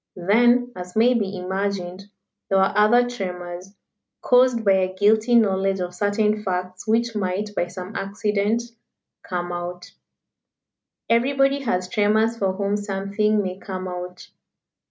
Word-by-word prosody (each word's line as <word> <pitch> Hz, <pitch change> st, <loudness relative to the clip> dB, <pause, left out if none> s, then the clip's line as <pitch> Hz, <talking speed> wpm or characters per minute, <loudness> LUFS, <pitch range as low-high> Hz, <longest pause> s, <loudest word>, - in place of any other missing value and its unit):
Then, 240 Hz, +7 st, +3 dB
as 180 Hz, 0 st, -8 dB
may 235 Hz, +3 st, +4 dB
be 200 Hz, -5 st, -2 dB
imagined, 190 Hz, 0 st, -3 dB, 0.4 s
there 195 Hz, -, +3 dB
were 190 Hz, 0 st, +3 dB
other 240 Hz, +4 st, +4 dB
tremors, 180 Hz, -4 st, -6 dB, 0.5 s
caused 250 Hz, -2 st, +3 dB
by 200 Hz, -, +5 dB
a 190 Hz, -1 st, +2 dB
guilty 220 Hz, +4 st, +3 dB
knowledge 195 Hz, -3 st, +2 dB
of 180 Hz, 0 st, -4 dB
certain 210 Hz, +2 st, 0 dB
facts 185 Hz, 0 st, -4 dB
which 230 Hz, +1 st, +1 dB
might 205 Hz, +1 st, -2 dB
by 175 Hz, -, -1 dB
some 185 Hz, +3 st, -8 dB
accident 205 Hz, +3 st, -1 dB, 0.6 s
"come 175 Hz, -1 st, -4 dB
out." 175 Hz, 0 st, -6 dB, 1.2 s
Everybody 275 Hz, +4 st, +2 dB
has 185 Hz, -9 st, -1 dB
tremors 215 Hz, +3 st, +2 dB
for 195 Hz, -4 st, -1 dB
whom 200 Hz, +1 st, -1 dB
something 205 Hz, +1 st, 0 dB
may 185 Hz, 0 st, -5 dB
come 185 Hz, -2 st, -6 dB
out. 180 Hz, 0 st, -7 dB
200 Hz, 135 wpm, -23 LUFS, 185-220 Hz, 1.2 s, by